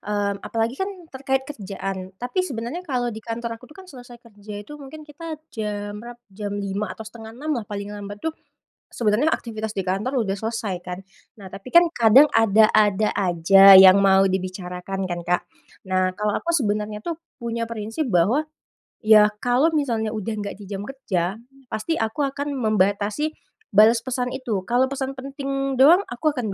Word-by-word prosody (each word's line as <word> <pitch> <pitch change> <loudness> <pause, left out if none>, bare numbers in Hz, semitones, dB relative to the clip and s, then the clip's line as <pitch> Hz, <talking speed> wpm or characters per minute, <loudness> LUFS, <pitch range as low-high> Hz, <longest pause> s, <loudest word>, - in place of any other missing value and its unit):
mmm, 205 -1 -1
apalagi 230 +2 -2
kan 385 +4 -2 0.2
terkait 265 -1 -2
kerjaan. 195 -6 -6
Tapi 250 +10 -1
sebenarnya 270 +4 -5
kalau 250 -6 -1
di 220 -2 -7
kantor 230 0 -4
aku 230 - -17
tuh - - -19
kan 375 - -14
selesai 245 -5 -13
kerja 210 -3 -10
itu 255 +9 -10
mungkin 290 +2 -11
kita 310 +1 -9
jam 205 -1 -5
berap 240 +3 -10
jam 205 +1 -6
5 200 0 -3
atau - - -15
setengah 225 0 -11
6 295 +5 -3
lah 230 - -4
paling 205 0 -6
lambat 205 0 -8
tuh 320 +4 -3 0.6
sebenarnya 235 +7 +1
aktivitas 220 -2 -4
di 195 - -3
kantor 195 +8 -1
udah 195 - -1
selesai, 220 -2 -3
kan. 180 0 -6 0.4
Nah 195 - -10
tapi 195 +6 -10
kan, 345 0 +7
kadang 240 +6 +7
ada-ada 215 -1 +4
aja 195 +2 +7
yang 190 +1 +8
mau 195 0 +5
dibicarakan 185 0 -4
kan, 175 -1 -3
Kak. 180 +1 +1 0.5
Nah, 185 0 +1
kalau 210 +2 -2
aku 340 - -3
sebenarnya 210 -7 -1
tuh 335 +9 -4 0.2
punya 235 0 -3
prinsip 230 +5 -4
bahwa, 205 - +2 0.6
ya 215 -1 +7 0.2
kalau 245 +6 +3
misalnya 230 -7 -1
udah 215 0 -4
nggak 200 -1 -5
di 205 - -13
jam 200 0 -5
kerja, 195 -9 -2 0.3
pasti 250 +8 -3
aku 225 +6 -1
akan 280 +1 -2
membatasi 215 +5 0 0.4
balas 220 +3 +6
pesan 250 +1 -3
itu. 245 -7 -3
Kalau 245 +6 +2
pesan 270 0 -3
penting 275 0 -3
doang 290 +8 +6
aku 275 +6 -1
akan 250 -5 -4
220 Hz, 170 wpm, -23 LUFS, 200-265 Hz, 0.6 s, yang